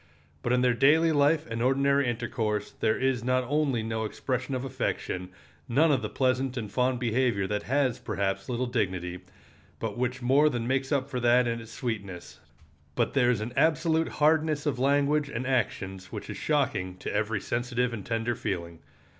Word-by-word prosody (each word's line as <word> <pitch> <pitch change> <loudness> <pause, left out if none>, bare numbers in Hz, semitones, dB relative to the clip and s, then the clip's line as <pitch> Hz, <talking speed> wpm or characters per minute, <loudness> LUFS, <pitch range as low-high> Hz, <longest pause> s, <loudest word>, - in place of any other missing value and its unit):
But 120 - -1
in 125 0 +3
their 125 -1 +3
daily 155 +7 +4
life 150 +1 +3
and 115 0 -4
ordinary 140 +1 +3
intercourse 115 -3 -2
there 110 - 0
is 130 -3 0
not 130 +1 +1
only 135 -3 0
no 110 0 -2
expression 130 +4 -3
of 130 +1 -3
affection, 120 -8 -3 0.4
none 155 +6 +4
of 135 -4 +2
the 105 - -3
pleasant 130 0 0
and 110 -4 -4
fond 125 0 +1
behavior 120 -4 +1
that 105 +1 -2
has, 135 -3 +1
perhaps, 100 +1 -2
little 125 +1 -1
dignity, 90 -7 -2 0.6
but 110 0 -4
which 125 0 -1
more 135 +5 +4
than 120 -4 -3
makes 135 +2 0
up 140 -2 +1
for 130 -3 -3
that 120 +1 +4
in 115 0 -2
its 115 0 -12
sweetness, 100 -8 -5 0.6
but - - 0
there 125 -3 +3
is 120 -4 +1
an 120 +3 -4
absolute 160 0 +2
hardness 155 0 +2
of 135 -5 -1
language 145 +2 +2
and 125 -1 -4
actions 95 -7 -2
which - - -6
is - - -6
shocking 105 -12 0
to - - -5
every 110 0 0
sensitive 120 +2 -1
and 105 -4 -5
tender 115 +1 0
feeling. 85 -6 -4
125 Hz, 180 wpm, -28 LUFS, 110-135 Hz, 0.6 s, daily